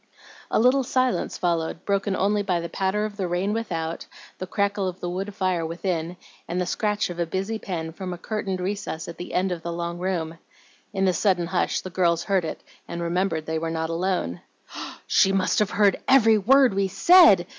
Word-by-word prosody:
A -, -, +2 dB
little 255 Hz, +4 st, +4 dB
silence 255 Hz, 0 st, 0 dB
followed, 170 Hz, -2 st, -1 dB
broken 200 Hz, 0 st, 0 dB
only 205 Hz, +2 st, +1 dB
by 185 Hz, -4 st, 0 dB
the 170 Hz, 0 st, -5 dB
patter 195 Hz, +4 st, 0 dB
of 210 Hz, -1 st, -7 dB
the 190 Hz, -3 st, -1 dB
rain 180 Hz, +4 st, -1 dB
without, 165 Hz, -8 st, -3 dB, 0.3 s
the 185 Hz, -, -5 dB
crackle 200 Hz, 0 st, 0 dB
of 185 Hz, 0 st, -5 dB
the 175 Hz, -, -4 dB
wood 195 Hz, +3 st, -4 dB
fire 185 Hz, -4 st, 0 dB
within, 170 Hz, +1 st, -3 dB, 0.3 s
and 180 Hz, -, -2 dB
the 180 Hz, -, 0 dB
scratch 210 Hz, +1 st, -1 dB
of 175 Hz, -, -8 dB
a 170 Hz, -, 0 dB
busy 195 Hz, +6 st, -2 dB
pen 165 Hz, -5 st, -4 dB
from 185 Hz, +1 st, -6 dB
a 175 Hz, -, -5 dB
curtained 195 Hz, 0 st, -3 dB
recess 190 Hz, -4 st, -4 dB
at 170 Hz, -, -8 dB
the 175 Hz, -, -6 dB
end 185 Hz, +1 st, +1 dB
of 175 Hz, -2 st, -3 dB
the 170 Hz, -, -4 dB
long 170 Hz, 0 st, -4 dB
room. 165 Hz, -3 st, -2 dB, 0.5 s
In 195 Hz, -2 st, 0 dB
the 185 Hz, -, +3 dB
sudden 180 Hz, -1 st, +1 dB
hush 180 Hz, +1 st, 0 dB
the 185 Hz, -, -8 dB
girls 170 Hz, -2 st, +1 dB
heard 190 Hz, -4 st, +1 dB
it 160 Hz, -, -6 dB, 0.2 s
and 170 Hz, -, -5 dB
remembered 170 Hz, -1 st, -1 dB
that 160 Hz, -, -5 dB
they 160 Hz, -, 0 dB
were 165 Hz, 0 st, -3 dB
not 160 Hz, 0 st, -2 dB
alone. 170 Hz, -, -1 dB, 0.6 s
"She 195 Hz, -, +4 dB
must 190 Hz, -1 st, +1 dB
have 210 Hz, -2 st, +2 dB
heard 200 Hz, -2 st, +3 dB
every 225 Hz, -5 st, +6 dB
word 260 Hz, +3 st, +5 dB
we 195 Hz, 0 st, +1 dB
said!" 210 Hz, -, +6 dB
185 Hz, 210 wpm, -24 LUFS, 170-200 Hz, 0.6 s, every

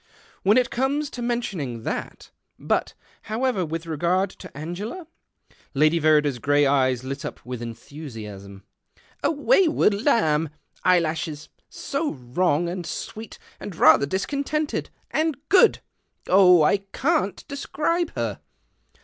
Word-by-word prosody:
" -, -, -29 dB
"When 205 Hz, +5 st, +4 dB
it 250 Hz, 0 st, +2 dB
comes 280 Hz, +4 st, -1 dB
to 245 Hz, -, -6 dB
men 240 Hz, 0 st, 0 dB
ionino 135 Hz, -, -5 dB
that -, -, -5 dB, 0.3 s
But, -, -, -1 dB, 0.3 s
however, 225 Hz, -3 st, 0 dB
with 165 Hz, 0 st, -4 dB
reo; 160 Hz, -3 st, -5 dB
ard 185 Hz, +2 st, +1 dB
:o -, -, -9 dB
Angela? 195 Hz, -, -6 dB, 0.4 s
" -, -, -32 dB
Lady 155 Hz, +4 st, +3 dB
Verrider's 150 Hz, -4 st, +3 dB
grey 145 Hz, +3 st, +3 dB
eyes 130 Hz, -3 st, +2 dB
lit 135 Hz, +1 st, -5 dB
up -, -, -6 dB
w^ith 125 Hz, -1 st, -6 dB
entliu 140 Hz, +6 st, -8 dB
dasm. 100 Hz, -3 st, -9 dB, 0.3 s
" -, -, -32 dB
A -, -, +3 dB
wayward 325 Hz, -, +3 dB
lamb. 160 Hz, -, +2 dB, 0.3 s
Eyelashes, 160 Hz, -3 st, +1 dB, 0.2 s
So 295 Hz, +2 st, -3 dB
wrong, 145 Hz, +6 st, 0 dB
md 175 Hz, 0 st, -4 dB
sweet, 215 Hz, +8 st, -7 dB, 0.2 s
and 195 Hz, -, -7 dB
rather 160 Hz, -3 st, +6 dB
discontented, 285 Hz, -, -2 dB, 0.2 s
and 315 Hz, -3 st, 0 dB
good! 400 Hz, +4 st, +5 dB, 0.4 s
Jh! 180 Hz, -3 st, +6 dB
I 200 Hz, -, +4 dB, 0.2 s
can't 300 Hz, -, 0 dB
describe 310 Hz, +4 st, -1 dB
her 115 Hz, -4 st, -2 dB
175 Hz, 140 wpm, -24 LUFS, -, 0.4 s, rather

